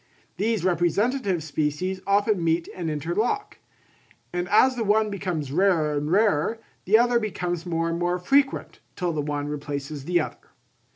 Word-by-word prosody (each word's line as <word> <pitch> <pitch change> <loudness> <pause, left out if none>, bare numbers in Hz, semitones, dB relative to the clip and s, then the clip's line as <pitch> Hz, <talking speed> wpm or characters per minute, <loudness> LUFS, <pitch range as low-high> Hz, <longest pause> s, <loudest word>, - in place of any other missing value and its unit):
These 215 +1 0
representative 185 - +1
species 160 +5 -2
often 200 -2 +2
meet 165 +1 +1
and 170 -3 -3
interlock; 175 - -2 0.7
and 180 +1 -2
as 255 +5 +5
the 235 - -1
one 215 0 +2
becomes 175 -8 -3
rarer 165 -3 +2
and 145 +1 -2
rarer, 205 0 +2 0.3
the 210 +4 +6
other 240 0 +3
becomes 180 -5 -3
more 165 -1 0
and 165 0 -2
more 175 +1 0
frequent, 270 +9 +1 0.2
till 175 -2 -1
the 150 - -1
one 145 0 -3
replaces 145 -1 -5
the 175 +1 +2
other. 155 - -6
175 Hz, 155 wpm, -25 LUFS, 155-210 Hz, 0.7 s, the